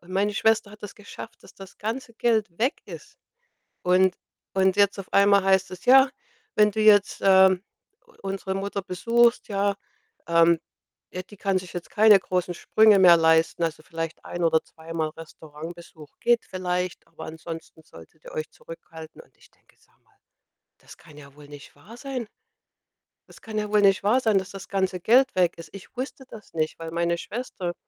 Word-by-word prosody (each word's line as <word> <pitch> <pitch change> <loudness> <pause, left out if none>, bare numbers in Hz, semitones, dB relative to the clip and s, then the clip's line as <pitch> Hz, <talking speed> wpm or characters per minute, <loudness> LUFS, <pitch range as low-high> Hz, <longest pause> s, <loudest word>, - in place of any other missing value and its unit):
Und 175 +1 -18
meine 205 +2 0
Schwester 220 0 +1
hat 210 0 -16
das 205 - -8
geschafft, 210 +2 -12
dass - - -17
das 195 0 -13
ganze 230 +2 -5
Geld 225 -2 +1
weg 250 +5 0
ist. - - -12 0.7
Und 185 +1 +3 0.4
und 190 -1 +2
jetzt 200 0 +3
auf 195 - -9
einmal 200 0 +5
heißt 190 -1 +2
es: 180 +4 -10
„Ja, 265 +2 +7 0.5
wenn 210 -1 +4
du 220 - -4
jetzt, 205 -2 +4
ähm, 190 -1 +5 0.4
u - - -23
unsere 195 0 -4
Mutter 200 +1 -3
besuchst, 235 +6 +1
ja, 200 0 0 0.5
ähm 170 0 +4 0.5
ja, 185 - -6
die 205 - -16
kann 195 0 0
sich 180 -3 -12
jetzt 175 - -7
keine 210 -2 +6
großen 180 -1 -2
Sprünge 215 +3 +4
mehr 175 -2 +7
leisten. 160 +1 +2
Also, 160 -1 -2
vielleicht 165 0 -6
ein 175 - -5
oder 160 -1 +3
zweimal 160 -1 -5
Restaurantbesuch 160 0 -12
geht 240 0 +2
vielleicht, 180 -1 -4
aber 165 - -11
ansonsten 160 0 -9
solltet - - -17
ihr - - -10
euch 465 -1 -4
zurückhalten.“ 315 - -12
Und - - -27
ich - - -22
denke: - - -31
„Sag - - -32
mal, - - -35 0.6
das - - -16
kann 155 -3 -17
ja 140 -2 -15
wohl 145 -1 -15
nicht 145 -1 -13
wahr 200 +12 -15
sein.“ 255 -4 -5 1.0
Das - - -17
kann 220 -1 -4
ja 210 0 -4
wohl 210 0 +3
nicht 195 -1 +4
wahr 215 +6 +3
sein, 220 -5 +2
dass 190 - -8
das 195 -1 -10
ganze 190 -2 -1
Geld 255 +8 +3
weg 180 -2 +2
ist. 165 -2 -11
Ich 195 +6 -13
wusste 265 +1 -6
das 220 -4 -14
nicht, 155 0 -2
weil 165 0 -6
meine 170 +1 0
Schwester, 185 -2 -5
190 Hz, 185 wpm, -24 LUFS, 170-215 Hz, 1.0 s, Ja